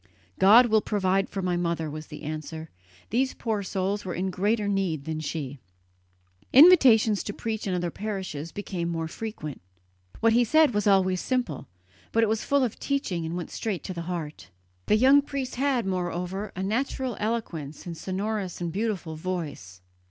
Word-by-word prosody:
"God 220 Hz, +6 st, +8 dB
will 220 Hz, -2 st, +3 dB
provide 195 Hz, -2 st, 0 dB
for 195 Hz, -, -4 dB
my 180 Hz, -1 st, 0 dB
mother," 170 Hz, -2 st, -1 dB
was 155 Hz, +1 st, -7 dB
the 150 Hz, -, -10 dB
answer; 155 Hz, +1 st, -6 dB, 0.4 s
"these 260 Hz, +4 st, +1 dB
poor 220 Hz, -3 st, -2 dB
souls 195 Hz, +1 st, -2 dB
were 185 Hz, -, -4 dB
in 190 Hz, +2 st, -1 dB
greater 205 Hz, +3 st, 0 dB
need 185 Hz, -8 st, -1 dB
than 160 Hz, -1 st, -3 dB
she." 145 Hz, -3 st, -4 dB, 0.9 s
Invitations 250 Hz, -, +7 dB
to 205 Hz, -, -5 dB
preach 220 Hz, -1 st, -4 dB
in 185 Hz, -, 0 dB
other 175 Hz, -1 st, -2 dB
parishes 190 Hz, -7 st, -5 dB
became 180 Hz, -4 st, -4 dB
more 165 Hz, -1 st, -2 dB
frequent. 160 Hz, -, -6 dB, 0.6 s
What 230 Hz, 0 st, +4 dB
he 240 Hz, +1 st, +5 dB
said 310 Hz, +2 st, +4 dB
was 210 Hz, 0 st, 0 dB
always 185 Hz, -2 st, +3 dB
simple, 250 Hz, -, -2 dB, 0.4 s
but 225 Hz, -, +3 dB
it 220 Hz, -, +2 dB
was 220 Hz, 0 st, 0 dB
full 280 Hz, -1 st, +2 dB
of 240 Hz, -, -2 dB
teaching 190 Hz, -, -2 dB
and 170 Hz, +2 st, -3 dB
went 175 Hz, -, -6 dB
straight 210 Hz, -6 st, -3 dB
to 185 Hz, -, -5 dB
the 170 Hz, -, -5 dB
heart. 155 Hz, -, -5 dB, 0.4 s
The 210 Hz, -, +4 dB
young 270 Hz, +5 st, +6 dB
priest 275 Hz, -3 st, -5 dB
had, 265 Hz, -4 st, +1 dB
moreover, 185 Hz, +2 st, -3 dB
a 190 Hz, -, -3 dB
natural 250 Hz, +3 st, -1 dB
eloquence 175 Hz, -10 st, -3 dB
and 170 Hz, -2 st, -5 dB
a -, -, -12 dB
sonorous 195 Hz, +1 st, -3 dB
and 170 Hz, -2 st, -3 dB
beautiful 195 Hz, -6 st, -2 dB
voice. 155 Hz, -, -5 dB
195 Hz, 175 wpm, -26 LUFS, 170-225 Hz, 0.9 s, God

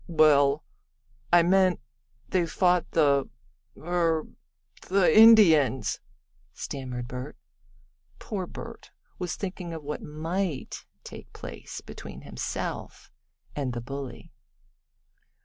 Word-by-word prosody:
"Well, 150 Hz, -3 st, +4 dB, 0.7 s
I 175 Hz, -1 st, +7 dB
meant 185 Hz, +1 st, +3 dB, 0.5 s
they 180 Hz, -2 st, +1 dB
fought 180 Hz, 0 st, +2 dB
the 140 Hz, -4 st, +2 dB, 0.5 s
er 165 Hz, -2 st, 0 dB, 0.6 s
the 190 Hz, -1 st, +4 dB
Indians," 195 Hz, -, +6 dB, 0.6 s
stammered 125 Hz, -3 st, -5 dB
Bert. 125 Hz, +4 st, -7 dB, 0.8 s
Poor 190 Hz, -4 st, -5 dB
Bert -, -, -10 dB, 0.3 s
was 180 Hz, -3 st, -3 dB
thinking 180 Hz, -3 st, -5 dB
of 160 Hz, -2 st, -7 dB
what 150 Hz, +1 st, -5 dB
might 160 Hz, +1 st, -4 dB, 0.2 s
take -, -, -11 dB
place -, -, -8 dB
between -, -, -10 dB
himself -, -, -5 dB, 0.4 s
and 135 Hz, -4 st, -2 dB
the 120 Hz, -, -4 dB
bully. 135 Hz, +1 st, -7 dB
160 Hz, 95 wpm, -27 LUFS, 140-180 Hz, 0.8 s, I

